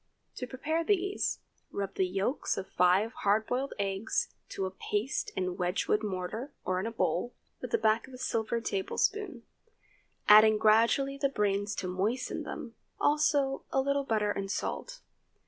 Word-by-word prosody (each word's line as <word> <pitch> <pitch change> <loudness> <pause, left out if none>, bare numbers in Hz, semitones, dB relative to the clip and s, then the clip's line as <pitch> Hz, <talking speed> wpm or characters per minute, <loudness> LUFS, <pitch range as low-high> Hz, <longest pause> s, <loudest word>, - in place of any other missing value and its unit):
To 250 - -4
prepare 315 +6 -1
these, 390 +2 0 0.3
rub 200 -1 -4
the 190 - +1
yolks 195 +9 -1
of 190 - -3
five 185 +6 +3
hard 210 +2 +2
boiled 260 +4 -2
eggs 205 - -1 0.2
to 195 - -3
a 190 - -3
paste 210 +6 -2
in 185 - 0
a - - -4
Wedgewood 180 +4 0
mortar, 210 +6 -4
or 185 0 0
in 200 - -2
a - - -3
bowl, 240 +1 -1 0.3
with - - -5
the 460 - +2
back 220 - +2
of 265 - -14
a - - -9
silver 230 -2 -1
tablespoon, 255 - -1 0.8
adding 215 +1 +8
gradually 230 +6 +3
the 275 0 +2
brains 205 -3 0
to 185 - -3
moisten 200 +8 -1
them, - - -6 0.3
also 290 -2 +2
a 270 - +2
little 280 +1 +1
butter 215 -5 +1
and 195 -1 -3
salt. - - -4
220 Hz, 165 wpm, -30 LUFS, 195-275 Hz, 0.8 s, adding